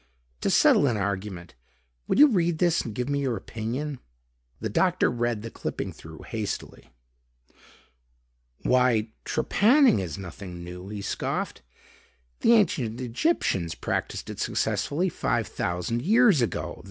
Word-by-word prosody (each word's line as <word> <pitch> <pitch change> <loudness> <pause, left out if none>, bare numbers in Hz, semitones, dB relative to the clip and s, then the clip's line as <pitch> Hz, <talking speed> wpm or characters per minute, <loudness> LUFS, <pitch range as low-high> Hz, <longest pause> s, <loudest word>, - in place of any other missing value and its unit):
"To - - +1
settle 145 - +5
an 120 -4 +1
argument, 95 -3 -4 0.5
would - - +1
you 295 - +10
read 175 - +2
this 175 -1 +2
and 110 -3 -7
give 125 +2 -2
me 140 0 0
your 130 -5 -1
opinion?" 125 +8 -4 0.6
The 110 - -2
doctor 180 - +2
read 120 -3 -1
the 115 - -6
clipping - - -4
through - - -12
hastily. - - -5 1.7
"Why 125 -3 +3 0.2
trepanning 235 - +4
is 85 -6 -4
nothing 90 -2 -8
new," 90 +2 -8
he 105 -1 -6
scoffed. - - -3 0.8
"The 235 - +5
ancient 130 - +2
Egyptians 120 - 0
practiced - - -3
it - - -9
successfully 170 +6 0
five - - -1
thousand 90 +7 -2
years 210 - +5
ago. 115 - -2
120 Hz, 130 wpm, -26 LUFS, 100-165 Hz, 1.7 s, you